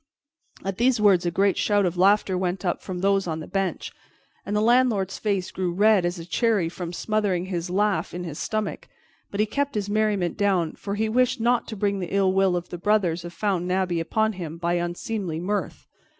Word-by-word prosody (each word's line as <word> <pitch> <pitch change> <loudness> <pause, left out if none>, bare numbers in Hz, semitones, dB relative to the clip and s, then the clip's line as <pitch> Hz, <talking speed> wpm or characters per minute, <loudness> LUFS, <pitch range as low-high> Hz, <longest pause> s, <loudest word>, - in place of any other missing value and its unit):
At 195 0 -3
these 245 -1 +3
words 195 -4 +4
a - - +3
great 195 +3 +1
shout 205 -2 +2
of 180 -1 -1
laughter 195 +1 +3
went 185 +1 -2
up 175 - -1
from 180 -2 -5
those 195 -1 +2
on 160 -1 -2
the 155 - -6
bench, 195 -1 -2 0.5
and 205 - -3
the - - +3
landlord's 225 -4 +2
face 200 -4 -1
grew 185 -2 -2
red 205 0 +4
as 175 +1 -3
a 165 - -7
cherry 205 -2 +1
from 170 0 -6
smothering 195 -2 -1
his 180 -2 -3
laugh 205 +2 0
in 180 +1 -5
his 160 -4 -6
stomach; 215 -1 -3 0.4
but 200 - -6
he 215 - +4
kept 285 +5 -2
his 205 -1 -2
merriment 205 -5 0
down, 185 -6 +2
for 200 0 -5
he 220 +1 0
wished 245 +2 +2
not 240 +1 +1
to 220 - -6
bring 200 0 0
the 180 +1 -4
ill 190 -1 +3
will 190 -1 +3
of 175 0 -4
the 175 - -6
brothers 180 -4 +1
of 175 - -7
Fountain 180 -1 -1
Abbey 185 -2 0
upon 220 +6 0
him 170 -4 -6
by 170 0 -1
unseemly 175 0 -3
mirth. 200 +4 -3
195 Hz, 210 wpm, -24 LUFS, 175-210 Hz, 0.5 s, words